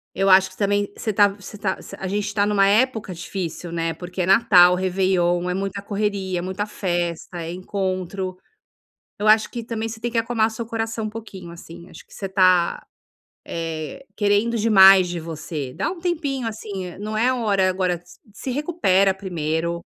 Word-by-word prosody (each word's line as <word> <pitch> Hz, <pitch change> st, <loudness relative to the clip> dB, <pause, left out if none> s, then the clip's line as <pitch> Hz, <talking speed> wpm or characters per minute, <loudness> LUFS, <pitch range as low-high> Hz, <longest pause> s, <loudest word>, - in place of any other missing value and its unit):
Eu 195 Hz, 0 st, +2 dB
acho 190 Hz, 0 st, +6 dB
que 185 Hz, -, -18 dB
também 205 Hz, 0 st, 0 dB
você 215 Hz, -, -2 dB
tá 205 Hz, 0 st, +5 dB
você 200 Hz, +1 st, -10 dB
tá 200 Hz, -1 st, -2 dB, 0.2 s
a 190 Hz, -, -4 dB
gente 205 Hz, +1 st, -2 dB
tá 205 Hz, -1 st, +2 dB
numa 200 Hz, -1 st, +3 dB
época 220 Hz, -2 st, +1 dB
difícil, 175 Hz, -1 st, -5 dB
né, 165 Hz, -1 st, -1 dB
porque 180 Hz, +2 st, -6 dB
é -, -, +1 dB
Natal, 185 Hz, -3 st, +6 dB
Réveillon, 180 Hz, -1 st, +1 dB
é -, -, 0 dB
muita 195 Hz, +1 st, -3 dB
correria, 200 Hz, -3 st, -2 dB
é -, -, -3 dB
muita 190 Hz, +3 st, -3 dB
festa, 175 Hz, -3 st, -3 dB
é 165 Hz, -, -5 dB
encontro. 185 Hz, 0 st, -3 dB, 0.8 s
Eu 210 Hz, +1 st, 0 dB
acho 215 Hz, 0 st, +5 dB
que 235 Hz, -2 st, -5 dB
também 225 Hz, -1 st, -3 dB
você 225 Hz, 0 st, -8 dB
tem 240 Hz, +1 st, -2 dB
que 230 Hz, -, -1 dB
acalmar 225 Hz, -1 st, +1 dB
seu 225 Hz, +1 st, -6 dB
coração 225 Hz, -1 st, -3 dB
um -, -, -4 dB
pouquinho, 195 Hz, -6 st, -9 dB
assim. 170 Hz, +1 st, -12 dB
Acho -, -, -13 dB
que -, -, -24 dB
você 195 Hz, -, -5 dB
tá, 185 Hz, -2 st, +3 dB, 0.6 s
eh, 165 Hz, -, -5 dB
querendo 210 Hz, +3 st, +2 dB
demais 195 Hz, -4 st, +7 dB
de 175 Hz, -1 st, -4 dB
você. 155 Hz, -4 st, -6 dB
Dá 310 Hz, -, -1 dB
um 360 Hz, -, -7 dB
tempinho 300 Hz, -8 st, -2 dB
assim, 205 Hz, -4 st, -6 dB
eh, 180 Hz, -, -10 dB
não 215 Hz, +1 st, -4 dB
é 245 Hz, +4 st, +3 dB
hora 205 Hz, -6 st, +1 dB
agora 180 Hz, -2 st, -1 dB
se 180 Hz, -, -17 dB
se 255 Hz, -, -6 dB
recupera 245 Hz, -, +2 dB
primeiro, 170 Hz, -3 st, -2 dB
195 Hz, 185 wpm, -22 LUFS, 180-215 Hz, 0.8 s, demais